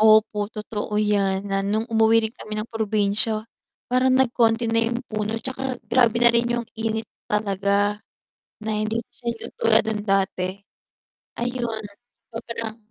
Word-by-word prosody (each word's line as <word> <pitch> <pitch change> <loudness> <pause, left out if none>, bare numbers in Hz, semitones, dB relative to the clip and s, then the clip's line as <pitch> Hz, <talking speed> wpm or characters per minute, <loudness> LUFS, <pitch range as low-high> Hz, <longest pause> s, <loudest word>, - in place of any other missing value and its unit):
Opo 215 -1 +5
totoo 210 -1 -4
yan, 200 -2 +2
na 195 - +2
nung 210 +3 0
umuwi 225 -1 +4
rin 220 - -3
kami 215 -3 -7
ng 215 +2 -3
probinsya, 215 0 +1 0.5
parang 255 0 +4
nagkonti 235 -2 +3
na 230 0 +3
yung 240 +2 -3
puno 215 0 -2
tsaka 260 +1 -3
grabe 235 -2 +3
na 240 0 +5
rin 235 0 +2
yung 240 -1 -1
init 225 0 -2 0.2
talaga, 205 0 +1 0.6
na 220 - -2
hindi 220 +2 -1
siya 240 0 -19 0.2
yung - - -8
tulad 220 -1 +5
nun 220 -1 -2
dati. 190 -1 +1 0.9
Ayun, 240 -2 -2 0.5
sobrang 230 -1 -5
220 Hz, 145 wpm, -24 LUFS, 210-235 Hz, 0.9 s, Opo